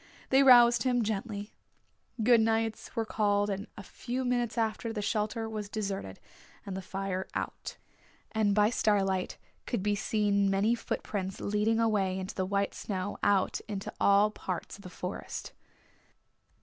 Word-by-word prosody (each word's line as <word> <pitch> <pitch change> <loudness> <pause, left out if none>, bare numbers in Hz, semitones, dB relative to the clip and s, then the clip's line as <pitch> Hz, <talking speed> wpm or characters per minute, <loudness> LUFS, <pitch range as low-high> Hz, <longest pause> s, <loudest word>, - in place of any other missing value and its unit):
They 265 +1 +6
roused 240 -3 +7
him 245 -1 +2
gently. 210 0 -4 0.7
Good 235 0 +6
nights 225 +1 -1
were 225 -1 0
called 205 -1 +1
and 200 +3 -4
a 200 - -7
few 255 +5 -4
minutes 245 -1 0
after, 225 0 -1
the 220 - -4
shelter 215 +2 -1
was 215 -2 -5
deserted, 195 - -4 0.5
and 195 - -5
the 190 - -4
fire 190 0 -4
out. - - -4 0.5
And 210 -3 +2
by 210 +1 +4
starlight 195 -5 +1 0.3
could 230 -7 -1
be 205 0 +2
seen 205 -1 +1
many 200 +4 +2
footprints 195 -4 -3
leading 210 +2 +1
away 200 -5 +1
in 190 - -3
the 185 -1 -2
white 200 0 0
snow 195 0 -4
out 200 -2 +2
into 200 -2 -5
all 200 +1 +5
parts 185 -4 -5
of - - -15
the 185 - -9
Forest. 180 +1 -6
210 Hz, 150 wpm, -30 LUFS, 195-225 Hz, 0.7 s, roused